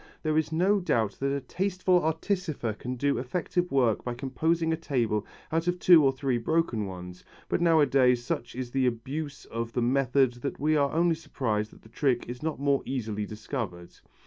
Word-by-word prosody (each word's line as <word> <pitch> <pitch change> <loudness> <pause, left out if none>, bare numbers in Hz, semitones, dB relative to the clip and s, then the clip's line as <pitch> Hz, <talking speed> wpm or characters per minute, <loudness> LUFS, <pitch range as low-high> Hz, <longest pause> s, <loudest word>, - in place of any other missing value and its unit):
There 155 -1 +1
is 155 0 +1
no 190 +6 +3
doubt 115 - 0
that 140 0 0
a 140 0 -1
tasteful 185 +4 +1
artificer 160 - -1
can 125 +4 -5
do 140 +3 0
effective 175 +6 -2
work 125 -5 +2
by 125 -1 -3
composing 160 +6 0
a - - +2
table 120 -10 -1 0.2
out 165 +2 0
of 175 0 +1
two 175 -3 +7
or 135 - +5
three 130 -2 -1
broken 120 -6 0
ones, 90 -1 -9 0.2
but - - 0
nowadays 135 -7 +4
such 120 - -3
is 125 -1 -5
the 130 -1 +2
abuse 140 +5 -4
of 115 0 -5
the 125 - 0
method 130 0 +2
that 140 - -4
we 155 +2 +2
are 140 -2 +2
only 170 +1 +3
surprised 110 -9 -2
that - - -19
the 110 - -16
trick 125 0 0
is 120 +1 -7
not 155 -2 -3
more 140 -1 +2
easily 110 -5 -3
discovered. 105 -5 -5
135 Hz, 190 wpm, -28 LUFS, 120-160 Hz, 0.2 s, two